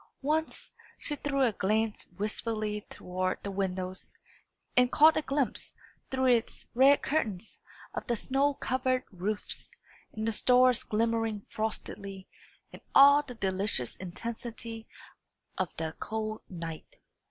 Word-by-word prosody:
Once, 310 +3 -1 0.3
she 295 - -1
threw 275 -1 0
a 240 - +4
glance 215 +2 0
wistfully 215 0 -2
toward 185 +1 -2
the 200 - -3
windows, 185 -1 -3 0.6
and 250 0 +5
caught 310 +1 +7
a - - +2
glimpse, 275 -3 -1 0.3
through 260 0 0
its 240 -3 +2
red 270 +4 +6
curtains, 225 - -2 0.3
of - - -5
the 240 - +1
snow 275 +5 +1
covered 255 0 0
roofs, 200 +3 -4 0.4
and 220 +1 -3
the - - +2
stars 250 +2 +5
glimmering 225 -1 0
frostily, 200 -3 -4 0.5
and - - -11
all 285 +1 +9
the 265 -4 -10
delicious 190 - 0
intensity 225 +4 -6 0.7
of 185 - 0
the 160 -1 -2
cold 215 0 -3
night. 165 -3 -7
225 Hz, 125 wpm, -30 LUFS, 200-255 Hz, 0.7 s, all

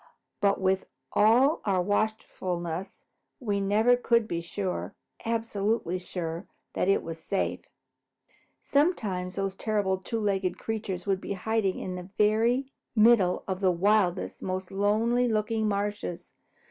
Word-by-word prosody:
But 200 -1 +2
with 190 0 +1 0.3
all 245 +8 +4
our 195 -3 +1
watchfulness, 185 -3 -2 0.4
we 205 -6 -1
never 215 +5 +4
could 235 -2 +2
be 170 -3 -2
sure, 185 +2 -4 0.3
absolutely 220 -5 -1
sure, 170 -1 -5 0.3
that 185 - 0
all 195 - +5
was 165 0 -6
safe. 195 +4 -2 0.9
Sometimes 205 - 0
those 195 -1 -1
terrible 200 -2 0
two 225 +4 -3
legged 195 -3 0
creatures 205 -5 -4
would 195 -2 0
be - - -3
hiding 200 0 0
in 185 - -4
the 180 +1 -7
very 230 +6 +2 0.2
middle 215 -5 +5
of 190 -1 -2
the 190 -2 +3
wildest, 190 0 +1
most 185 0 -3
lonely 220 +5 +2
looking 220 0 0
marshes. 205 -3 -3
200 Hz, 130 wpm, -28 LUFS, 185-220 Hz, 0.9 s, all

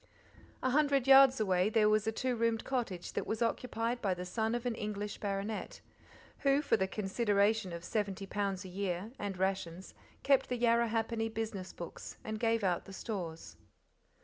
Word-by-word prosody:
A 255 - +2
hundred 280 -2 +3
yards 270 -1 +8
away 190 -2 +2
there 215 -1 +4
was 215 0 +2
a - - +2
two 250 +3 -1
roomed 230 -1 +1
cottage 230 -9 -3
that - - -2
was 220 +2 0
occupied 230 0 -1
by 195 -4 +1
the 180 0 -5
son 220 +5 -1
of 240 0 -4
an 245 - 0
English 210 -1 -4
baronet, 200 +1 -3 0.6
who, 275 +1 +3
for - - +3
the 190 -3 0
consideration 205 0 +1
of 170 0 -6
seventy 200 -1 -2
pounds 195 -1 -2
a - - -6
year 185 +2 -3
and 200 -2 -3
rations 190 -1 -2 0.3
kept 275 -1 +3
the 250 - -1
Yarrahappini 230 -1 +1
business 215 -4 -4
books 170 - -8
and 220 0 -4
gave 230 -1 +1
out 180 -3 0
the 195 - -10
stores. 175 -6 -6
215 Hz, 175 wpm, -33 LUFS, 195-230 Hz, 0.6 s, yards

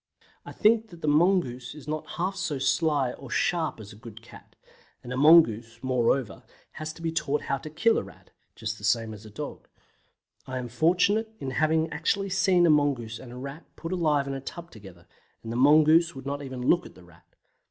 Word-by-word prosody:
I - - -7
think 225 +1 +2
that 170 -2 -14
the - - -1
mongoose 150 -6 +1
is 150 -1 -12
not 155 0 -5
half 185 +3 -1
so 170 -6 -2
sly 140 -1 +1
or 135 - -11
sharp 165 -3 0
as 105 -1 -10
a - - -13
good 115 0 -12
cat, - - -16 0.5
and 125 - -6
a - - -3
mongoose, 120 -7 +5
moreover, 125 -3 0 0.3
has 155 0 -6
to 165 - -13
be 165 - -1
taught 150 -2 -1
how 140 - -2
to 155 - -8
kill 220 +10 +2
a - - -5
Rat - - -16 0.2
(just 110 0 -5
the - - -15
same 115 0 +1
as 105 +1 -11
a - - -11
dog). 105 - -8 0.8
I 130 -1 -4
am 125 -1 -5
fortunate 180 - +2
in 135 - -4
having 160 +4 +1
actually 195 +6 -1
seen 185 -2 +3
a 165 - +5
mongoose 130 -7 0
and 120 - -11
a 125 - -9
Rat 140 +5 -8
put 165 - -7
alive 155 -6 +1
in 140 - -4
a 135 - -5
tub 170 +5 -9
together, 95 -6 -14 0.4
and 115 - -6
the - - -4
mongoose 155 +5 +5
would 135 0 -9
not 140 +1 -3
even 130 -3 -6
look 175 0 +3
at - - -17
the 90 - -16
Rat. 90 -2 -22
145 Hz, 215 wpm, -27 LUFS, 120-165 Hz, 0.8 s, mongoose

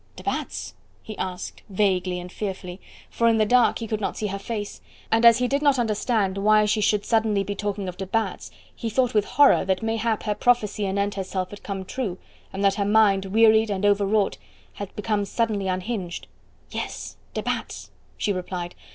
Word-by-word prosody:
"De - - -11
Batz?" - - -3 0.3
he 215 - -7
asked 180 -1 -5
vaguely 185 -2 +1
and 180 0 -9
fearfully, 190 -3 -5 0.3
for 230 - +2
in 225 -1 +4
the 215 - +3
dark 245 +2 +4
he 230 - -5
could 215 0 -2
not - - -2
see 215 - -2
her 200 -1 -3
face, 205 0 -5 0.3
and 225 +1 +3
as 230 -1 +7
he 250 0 +1
did 280 +3 0
not 285 -2 +4
understand 215 -3 0
why 215 +1 +4
she 210 +1 +1
should 205 0 +2
suddenly 220 -3 +2
be 205 - -3
talking 200 -1 -3
of 180 0 -6
de 190 0 -5
Batz 225 +3 -2 0.3
he 230 - -4
thought 250 +2 +1
with 210 -2 +3
horror 285 +2 +5
that 190 +2 -1
mayhap 225 0 0
her 210 - 0
prophecy 210 -3 +1
anent 200 +1 0
herself 185 -1 -3
had 205 - -10
come 195 -2 -5
true, 195 -3 -3 0.3
and 195 +1 -4
that 195 - +5
her - - +3
mind 200 -2 +4
wearied 220 +2 +5
and 200 0 -1
over 205 0 +3
wrought 210 -1 +1 0.3
had 200 -2 -6
become 210 0 -1
suddenly 210 -2 -1
unhinged. 185 -1 -3 0.5
"Yes, - - -5 0.2
de - - -2
Batz," - - -4 0.3
she 205 - 0
replied. 180 -1 -4
205 Hz, 195 wpm, -24 LUFS, 195-225 Hz, 0.5 s, as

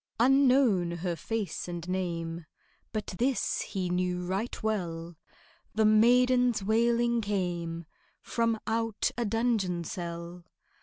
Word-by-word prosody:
Unknown 255 -7 +4
her 170 0 -3
face 210 +5 -3
and 175 -1 -6
name, 170 -3 -3 0.5
But 215 -2 -3
this 260 +1 +1
he 190 -3 -3
knew 180 0 -1
right 195 +6 -3
well, 170 -6 -2 0.6
The 220 0 +3
maiden's 245 +1 +4
wailing 235 +2 +2
came 175 -5 -2 0.4
From 230 -1 0
out 225 -1 0
a 235 - -1
dungeon 210 -6 0
cell. 170 +1 -6
205 Hz, 110 wpm, -29 LUFS, 175-230 Hz, 0.6 s, Unknown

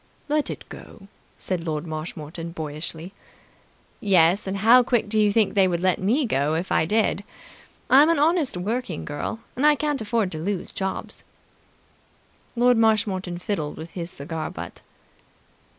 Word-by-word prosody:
"Let 300 0 0
it - - -7
go!" 195 -3 -12 0.3
said 180 -3 -3
Lord 155 -1 -3
Marshmoreton 160 +1 -6
boyishly. 160 +3 -5 0.9
"Yes, 190 -1 +3
and 190 +1 -2
how 230 +5 +7
quick 240 -3 +1
do 215 +1 0
you 210 -1 +4
think 215 -1 +2
they 195 -2 +4
would 175 -2 -1
let 185 0 +1
me 245 +10 +2
go, 150 - 0
if 170 +3 -3
I 160 - +2
did? 215 0 +1 0.6
I'm 285 +4 +6
an 335 - +3
honest 305 - +2
working 205 -1 -3
girl, 150 +9 -4
and 260 - -2
I 300 0 +6
can't 295 -3 -1
afford 215 -3 0
to 155 - -5
lose 190 +3 -3
jobs." 190 -1 -5 1.3
Lord 245 0 +4
Marshmoreton 200 -5 +1
fiddled 175 -5 -3
with 160 +1 -8
his 170 -2 -5
cigar 155 +1 -5
butt. 85 +1 -8
190 Hz, 155 wpm, -24 LUFS, 165-230 Hz, 1.3 s, how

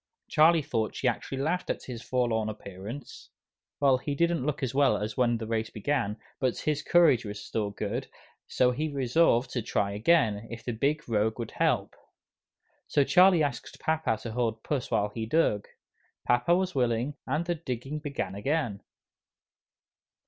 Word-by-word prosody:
Charlie 160 0 +5
thought 110 -5 -2
she 130 - -1
actually 125 +2 -2
laughed 180 +4 -1
at - - -2
his 120 -3 -7
forlorn 120 -4 0
appearance. 105 +5 -9 0.5
Well, 135 -3 +4
he 145 +1 -3
didn't 170 -2 +1
look 150 +1 -2
as 125 - -1
well 140 +1 +3
as 105 +1 -4
when 120 -2 +2
the 110 - -5
race 110 0 -1
began, 110 -2 -1 0.2
but 130 -3 0
his 150 -1 -1
courage 165 -8 +4
was 105 -1 -6
still 105 -2 -2
good; 100 - -4 0.4
so 125 -1 +3
he 150 +5 -2
resolved 130 -2 +2
to 120 - -1
try 100 -2 -1
again, 110 -2 +2
if 115 -1 -8
the 120 - -1
Big 145 +7 -1
Rogue 110 -1 +1
would 115 -2 -5
help. - - 0 0.9
So 145 - +3
Charlie 180 +1 +5
asked 140 -5 -4
papa 160 -8 0
to 115 - -5
hold 115 -1 -1
Puss 140 -5 -2
while 105 0 +1
he 110 +1 -5
dug. 115 -7 +1 0.6
Papa 120 +8 +3
was 185 0 0
willing, 125 +1 0
and 155 +6 0
the 175 - 0
digging 140 -2 -5
began 140 -10 -4
again. 115 -1 -1
125 Hz, 165 wpm, -28 LUFS, 110-150 Hz, 0.9 s, Charlie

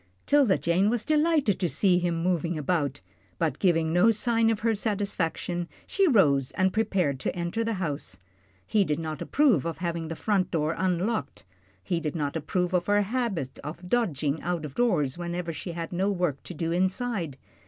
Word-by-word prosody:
'Tilda 275 -9 +4
Jane 180 +5 +2
was 235 -1 -1
delighted 305 - +2
to 180 -3 0
see 180 -1 +3
him 170 -2 -1
moving 170 -2 0
about, 145 -3 -1 0.4
but, 155 -5 -1
giving 165 -4 +2
no 180 +6 +5
sign 225 +1 +2
of 225 -2 0
her 225 0 +2
satisfaction, 190 -5 -2 0.2
she 390 -2 +2
rose 145 - +4
and 190 0 +1
prepared 190 -11 0
to - - -2
enter 175 +6 -2
the 225 -1 -1
house. 150 - -4 0.5
He 210 - +3
did 150 -5 -1
not 155 -2 -5
approve 265 - +3
of 165 -1 -3
having 170 -2 -3
the 165 - -4
front 195 0 0
door 155 -1 0
unlocked, 185 - -1 0.4
he 170 - -1
did 155 -1 -4
not 145 -2 -2
approve 180 +4 -1
of 180 -1 +1
her 205 0 +3
habit 205 - -2
of 170 +4 -7
dodging 155 - 0
out 175 -3 -2
of 140 - -7
doors 175 - +1
whenever 175 -1 -3
she 170 +3 -6
had 165 +1 -5
no 190 +3 +1
work 175 -8 -1
to 180 - -7
do 165 +1 -2
inside. 185 - -1
175 Hz, 185 wpm, -27 LUFS, 160-205 Hz, 0.5 s, no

